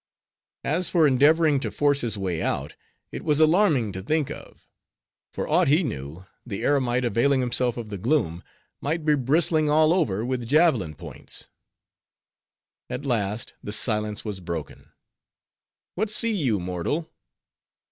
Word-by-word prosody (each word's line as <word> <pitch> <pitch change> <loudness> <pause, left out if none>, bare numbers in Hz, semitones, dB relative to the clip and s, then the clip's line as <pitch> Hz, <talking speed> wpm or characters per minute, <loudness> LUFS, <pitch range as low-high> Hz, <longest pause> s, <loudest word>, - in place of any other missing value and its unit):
As 170 +5 +1
for 165 -3 +4
endeavoring 150 +2 +4
to - - -3
force 145 -1 +1
his 110 -3 -3
way 90 -4 -2
out, - - -2 0.4
it - - -6
was 150 -2 +1
alarming 155 - +3
to 95 - -6
think 150 +7 -1
of; - - -11 0.7
for - - -4
aught 170 +2 +3
he 155 +7 +4
knew, 80 - -6 0.2
the 100 -5 -5
eremite, 125 -3 +1
availing 120 +5 +2
himself 125 -1 0
of 115 -3 -6
the 100 -2 -6
gloom, 100 - 0 0.4
might 155 +2 -2
be 150 - +4
bristling 155 +3 +2
all 155 +2 +4
over 115 - 0
with 125 -2 -3
javelin 145 - +3
points. - - -9 1.4
At 145 - -5
last, 110 -4 -2
the 105 - -6
silence 105 -1 -1
was 105 -3 -4
broken. 85 -3 -7 1.0
"What 215 +4 -1
see 230 +2 +1
you, 130 - 0
mortal?" 90 - -3
130 Hz, 145 wpm, -25 LUFS, 105-155 Hz, 1.4 s, for